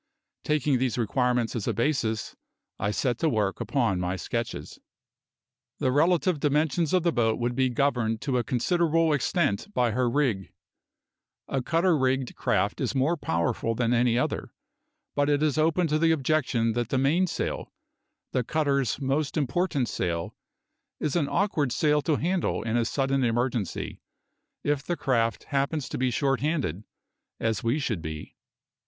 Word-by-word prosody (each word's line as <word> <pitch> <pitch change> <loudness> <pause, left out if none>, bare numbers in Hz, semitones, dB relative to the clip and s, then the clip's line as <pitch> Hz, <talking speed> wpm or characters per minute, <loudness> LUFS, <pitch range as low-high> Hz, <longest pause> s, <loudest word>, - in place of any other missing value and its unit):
Taking 150 -4 +1
these 130 -1 0
requirements 120 +1 0
as 110 - -3
a - - 0
basis, 115 -4 -1 0.4
I 100 - 0
set 120 +2 -1
to 165 - +2
work 105 -6 0
upon 115 -10 0
my 90 +1 -1
sketches. 110 - -4 1.0
The 130 - +1
relative 170 +3 +2
dimensions 150 +2 +1
of 185 -2 +3
the 170 - +3
boat 115 -5 +1
would 120 0 0
be 130 0 +2
governed 120 -4 0
to 130 -3 0
a - - 0
considerable 165 - +2
extent 145 - 0
by 120 -2 +2
her 125 +2 +1
rig. 120 -8 0 1.0
A 135 - -1
cutter 165 +6 +2
rigged 130 -2 0
craft - - 0
is - - -1
more 140 +6 +2
powerful 115 - -1
than 120 0 +1
any 120 0 +3
other, 125 - -1 0.6
but 145 0 +1
it 145 +1 +2
is 155 -1 +1
open 165 +3 +2
to 155 +1 +2
the 165 0 +3
objection 135 -7 +1
that 120 0 -2
the 135 - 0
mainsail 160 +7 0 0.6
the 125 - 0
cutter's 140 -2 0
most 140 +3 -1
important 145 -1 0
sail 85 -2 -2 0.6
is 150 - -1
an 150 -5 +1
awkward 165 -8 +1
sail 150 +3 +2
to 155 +1 +1
handle 175 - 0
in 115 0 -1
a 120 -1 +2
sudden 135 +2 0
emergency, 120 -4 -1 0.6
if 145 -1 +1
the 175 +1 -2
craft 115 -3 0
happens 140 0 -1
to - - -4
be 130 0 +2
short 135 +1 +1
handed, 135 - -1 0.5
as 110 -2 -1
we 115 +5 +1
should 115 - -2
be. 80 -1 -7
135 Hz, 160 wpm, -27 LUFS, 115-150 Hz, 1.0 s, of